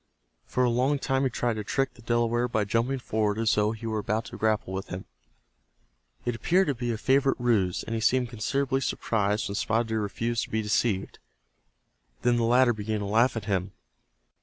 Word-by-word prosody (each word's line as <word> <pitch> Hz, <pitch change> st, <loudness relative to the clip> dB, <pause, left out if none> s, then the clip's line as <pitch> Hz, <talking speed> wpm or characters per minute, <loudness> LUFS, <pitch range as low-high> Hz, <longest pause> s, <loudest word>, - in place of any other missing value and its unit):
For 125 Hz, -, +1 dB
a 125 Hz, -, +3 dB
long 130 Hz, +5 st, +2 dB
time 135 Hz, 0 st, 0 dB
he -, -, +2 dB
tried 120 Hz, -1 st, -1 dB
to 105 Hz, -, -3 dB
trick 135 Hz, +6 st, -1 dB
the 120 Hz, -, -17 dB
Delaware 120 Hz, +1 st, +1 dB
by 110 Hz, -3 st, 0 dB
jumping 115 Hz, +6 st, 0 dB
forward 110 Hz, -4 st, -1 dB
as 115 Hz, -1 st, +2 dB
though 105 Hz, 0 st, +2 dB
he 115 Hz, 0 st, -7 dB
were 110 Hz, -1 st, -1 dB
about 105 Hz, +2 st, -1 dB
to -, -, -9 dB
grapple 110 Hz, -3 st, 0 dB
with 95 Hz, +1 st, -4 dB
him. 90 Hz, +1 st, -6 dB, 1.2 s
It 120 Hz, -, 0 dB
appeared 175 Hz, -, +2 dB
to -, -, +2 dB
be 120 Hz, -1 st, -3 dB
a 115 Hz, -, -2 dB
favorite 135 Hz, +3 st, +2 dB
ruse, 105 Hz, -7 st, +1 dB
and 115 Hz, -, -5 dB
he 115 Hz, -, -1 dB
seemed 125 Hz, +3 st, +2 dB
considerably 135 Hz, +4 st, -1 dB
surprised 105 Hz, -4 st, 0 dB
when 100 Hz, -, -4 dB
Spotted 115 Hz, +2 st, 0 dB
Deer 110 Hz, -1 st, 0 dB
refused 115 Hz, +3 st, -2 dB
to -, -, -17 dB
be 110 Hz, 0 st, -1 dB
deceived. 105 Hz, -2 st, 0 dB, 1.0 s
Then 120 Hz, -1 st, +3 dB
the 120 Hz, -, +1 dB
latter 120 Hz, +1 st, +4 dB
began 110 Hz, 0 st, -3 dB
to -, -, -3 dB
laugh 115 Hz, +4 st, +2 dB
at 115 Hz, -, -4 dB
him. 95 Hz, -1 st, -1 dB
115 Hz, 205 wpm, -27 LUFS, 105-125 Hz, 1.2 s, latter